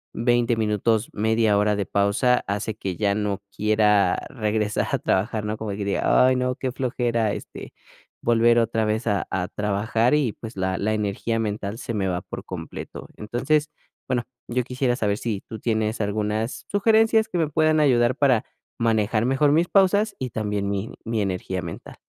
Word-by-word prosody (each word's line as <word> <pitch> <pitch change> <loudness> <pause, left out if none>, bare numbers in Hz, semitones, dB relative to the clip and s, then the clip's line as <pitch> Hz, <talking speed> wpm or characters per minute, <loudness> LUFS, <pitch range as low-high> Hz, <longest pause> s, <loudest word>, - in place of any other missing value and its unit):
20 120 0 +2
minutos, 110 +1 +1
1/2 110 -1 +2
hora 105 0 +2
de 100 -2 -2
pausa, 100 +7 +2
hace 105 +1 -2
que 95 -5 -4
ya 100 -1 +1
no 105 -2 -2
quiera 105 -3 +3
regresar 105 -3 -1
a - - +2
trabajar, 105 +2 0
¿no? 105 +1 -2
Como 110 -2 -4
que 100 0 -4
diga: 100 +5 +3
"Ay, 130 - +3
no, 125 0 0
qué 130 -2 -3
flojera", 120 -4 0
este, - - -8 0.5
volver 120 0 +4
otra 115 -1 +1
vez 110 +3 -1
a 100 -2 0
a 90 -1 -1
trabajar 105 +4 0
y, 130 -8 +1
pues, 110 -2 -10
la 95 0 -1
la 110 +2 0
energía 110 +2 -1
mental 105 0 -3
se 115 - -5
me 95 -3 -1
va 90 -1 -1
por - - -8
completo. - - -7
Entonces, 135 +8 0 0.4
bueno, 125 -2 0 0.2
yo 125 +1 0
quisiera 125 0 -1
saber 105 -3 0
si 110 -4 -3
tú 110 - -7
tienes 110 -1 -1
algunas 105 +2 -2
sugerencias 220 +2 +3
que 175 - -2
me 160 -3 +1
puedan 155 0 +2
ayudar 125 -4 +3
para 130 -6 +3 0.3
manejar 110 0 +1
mejor 135 +3 +3
mis 165 +3 +3
pausas 200 +2 +3
y 130 -3 -4
también 105 -2 -2
mi 100 +2 -3
mi 115 -2 -1
energía 95 -1 -2
mental. - - -8
110 Hz, 175 wpm, -24 LUFS, 105-125 Hz, 0.5 s, volver